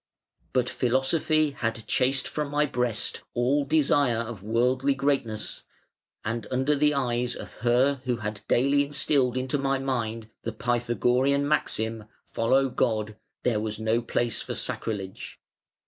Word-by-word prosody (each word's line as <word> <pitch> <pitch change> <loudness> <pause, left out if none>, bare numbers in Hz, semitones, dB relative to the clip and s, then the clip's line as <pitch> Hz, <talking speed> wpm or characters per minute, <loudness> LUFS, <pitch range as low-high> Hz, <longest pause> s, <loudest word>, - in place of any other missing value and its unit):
But 125 -1 +1
Philosophy 145 +5 +2
had 115 -4 -3
chased 130 0 +1
from 150 -1 -3
my 145 +1 +2
breast 125 -5 -1
all 135 +4 +2
desire 140 -4 +3
of 115 -3 -4
worldly 125 +6 +1
greatness, 135 -6 -1 0.6
and 115 +2 -3
under 130 +3 +1
the 150 +1 +3
eyes 120 -2 0
of - - -9
her 125 +3 +3
who 125 -1 +1
had 110 -2 -5
daily 140 +3 +3
instilled 140 -3 +1
into 130 +2 -1
my 135 0 +1
mind 115 -4 -2
the 115 - -4
Pythagorean 120 +4 +1
maxim 110 -7 -1 0.2
'Follow 130 +4 +2
God,' 110 -4 0 0.3
there 115 -4 +2
was 110 0 -3
no 110 +2 +1
place 120 0 -1
for - - -4
sacrilege. 100 -4 -4
125 Hz, 135 wpm, -27 LUFS, 115-140 Hz, 0.6 s, desire